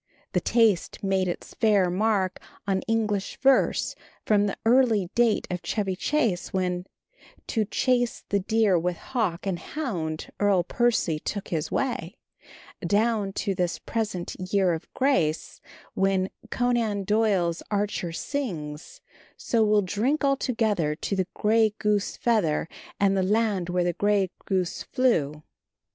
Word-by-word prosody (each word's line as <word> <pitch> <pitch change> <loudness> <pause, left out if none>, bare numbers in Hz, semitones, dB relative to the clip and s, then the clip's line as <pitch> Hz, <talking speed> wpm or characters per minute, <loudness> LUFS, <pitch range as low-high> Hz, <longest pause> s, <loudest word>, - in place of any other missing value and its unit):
The - - +1
taste 225 -7 +2
made 190 -1 +1
its 175 - -5
fair 200 -5 +3
mark 195 -1 +1 0.3
on 195 -1 0
English 215 -3 -1
verse 270 0 +3 0.3
from 205 -1 +3
the 200 - -3
early 225 -6 +3
date 235 -2 +2
of 180 -1 -3
Chevy 195 -4 -1
Chase, 230 -5 0
when, 180 -1 -1 0.6
To 220 -2 +1
chase 245 +3 0
the 200 - +2
deer 210 -2 +2
with 175 +1 -2
hawk 210 -10 -2
and 185 -3 -1
hound 175 - -4
Earl 200 -3 +3
Percy 205 -6 +1
took 200 +5 -5
his 160 -3 -2
way, 265 -3 -2 0.7
down 205 +2 +1
to 200 0 -1
this 180 -2 -1
present 210 -6 -3 0.2
year 190 -3 +3
of 160 - -6
grace, 215 - 0 0.3
when 195 -1 +1 0.2
Conan 235 -5 0
Doyle's 195 -5 +1
archer 205 -4 -1
sings: 170 - -5 0.4
So 230 -2 +1
we'll 210 -1 +3
drink 230 +11 0
all 275 -1 +4
together 215 - 0
To 195 - -3
the 185 -2 0
grey 215 0 +3
goose 210 -1 0
feather, 205 -11 +1 0.3
And 195 -1 +3
the 190 - +2
land 200 -2 +1
where 180 0 +1
the 175 0 0
grey 200 -1 +1 0.2
goose 185 -3 -1
flew. 155 - 0
200 Hz, 140 wpm, -26 LUFS, 180-225 Hz, 0.7 s, all